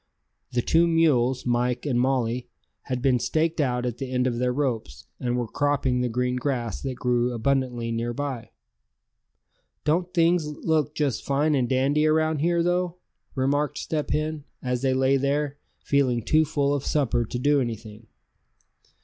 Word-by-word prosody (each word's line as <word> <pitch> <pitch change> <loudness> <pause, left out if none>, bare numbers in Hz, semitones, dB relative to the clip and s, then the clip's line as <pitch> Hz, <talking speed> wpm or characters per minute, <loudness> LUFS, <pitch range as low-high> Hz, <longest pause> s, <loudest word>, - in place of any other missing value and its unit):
The 120 -1 +1
two 170 +1 +4
mules, 135 -7 +2
Mike 125 +1 0
and 130 -4 +1
Molly, 125 -2 0 0.4
had 125 -2 -3
been 130 -2 +3
staked 160 +4 0
out 125 -3 0
at 120 -1 -3
the 135 -2 -4
end 125 0 +1
of 120 -2 -1
their 125 0 +1
ropes, 115 - -3
and 125 -1 -1
were 120 -2 -1
cropping 140 -1 0
the 125 - 0
green 125 +2 -1
grass 125 -4 -2
that 135 -2 -3
grew 125 0 +1
abundantly 120 -1 -1
near 115 +1 -2
by. 130 -3 -4 1.3
"Don't 175 +4 +1
things 170 -2 +2
look 150 0 -1
just 145 -5 -1
fine 145 +2 +1
and 130 -4 +1
dandy 140 +4 +2
around 155 0 +2
here, 170 +2 +2
though?" 175 0 0 0.4
remarked 140 +2 0
Step 155 -2 -3
Hen, 155 -1 -1 0.2
as 125 -1 -2
they 130 -1 +1
lay 135 +1 +3
there, 145 +1 -1 0.2
feeling 130 -5 +1
too 155 +6 +3
full 145 -2 0
of 140 -1 -1
supper 135 -5 +1
to 115 - -5
do 145 +3 +3
anything. 110 -2 -6
135 Hz, 165 wpm, -25 LUFS, 125-150 Hz, 1.3 s, two